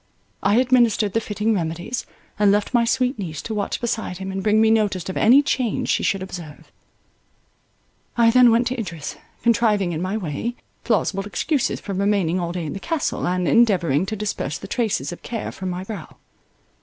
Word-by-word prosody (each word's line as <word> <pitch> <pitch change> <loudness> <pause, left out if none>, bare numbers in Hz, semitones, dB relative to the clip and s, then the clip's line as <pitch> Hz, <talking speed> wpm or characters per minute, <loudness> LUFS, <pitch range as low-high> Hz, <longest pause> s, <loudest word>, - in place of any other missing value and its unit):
I 205 +1 +3
administered 240 -5 +3
the 225 - +1
fitting 215 +1 -1
remedies, 175 +5 -3 0.3
and 205 -1 +5
left 210 +4 0
my 235 -1 +4
sweet 250 0 0
niece 160 -6 -5
to 225 - -4
watch 205 -2 -2
beside 225 -6 -3
him, 190 +1 -5
and 190 0 -3
bring 215 +2 +3
me 220 0 +5
notice 205 -5 +1
of 190 - -4
any 260 +6 +6
change 255 -6 -1
she - - +2
should 195 -1 0
observe. 175 -5 -9 1.5
I 230 -1 +5
then 250 0 +7
went 230 +2 +3
to 255 0 -3
Idris, 170 -8 -5 0.3
contriving 215 -5 +2
in 160 -1 -3
my 190 +4 -1
way, 205 +6 -3 0.3
plausible 195 -3 0
excuses 260 - -1
for 200 - -6
remaining 195 -3 +1
all 170 -1 -2
day 175 -2 -4
in 150 - -4
the - - -5
Castle, 325 - -2
and 180 0 0
endeavouring 185 - +3
to 215 - -3
disperse 200 -9 -3
the - - -9
traces 210 - -1
of 175 - -9
care 230 -3 -4
from 185 -1 -5
my 180 +1 -4
brow. 195 -5 -8
205 Hz, 190 wpm, -22 LUFS, 180-230 Hz, 1.5 s, then